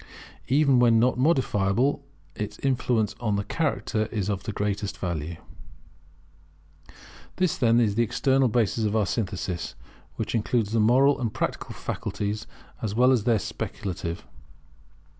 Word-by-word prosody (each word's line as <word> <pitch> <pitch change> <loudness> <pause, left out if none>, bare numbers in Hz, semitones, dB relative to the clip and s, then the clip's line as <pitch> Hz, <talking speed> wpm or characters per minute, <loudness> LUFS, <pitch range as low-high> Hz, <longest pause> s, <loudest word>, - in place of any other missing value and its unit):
[Even 140 -1 +4
where 120 -1 +5
not 115 +2 +3
modifiable, 130 -3 +2 0.3
its 105 0 -5
influence 125 -5 0
on 110 -4 0
the 100 - -1
character 110 -4 -1
is 105 -4 -3
of 100 -2 -1
the 110 - -2
greatest 100 -1 -2
value] 85 -2 -3 2.0
This, 185 -3 +1
then, 115 -2 +3
is 110 -4 +2
the 115 - +1
external 130 +4 +2
basis 115 -1 +1
of 105 0 0
our 110 -2 +3
synthesis, 95 -4 -3 0.4
which - - -3
includes 115 -1 0
the 115 - +1
moral 130 +6 +4
and 115 -3 -1
practical - - -3
faculties, 105 +2 -4 0.3
as 105 -2 -3
well 125 +2 +5
as 120 -5 +2
the 115 -3 +4
speculative. 90 -3 -5
110 Hz, 140 wpm, -26 LUFS, 100-125 Hz, 2.0 s, where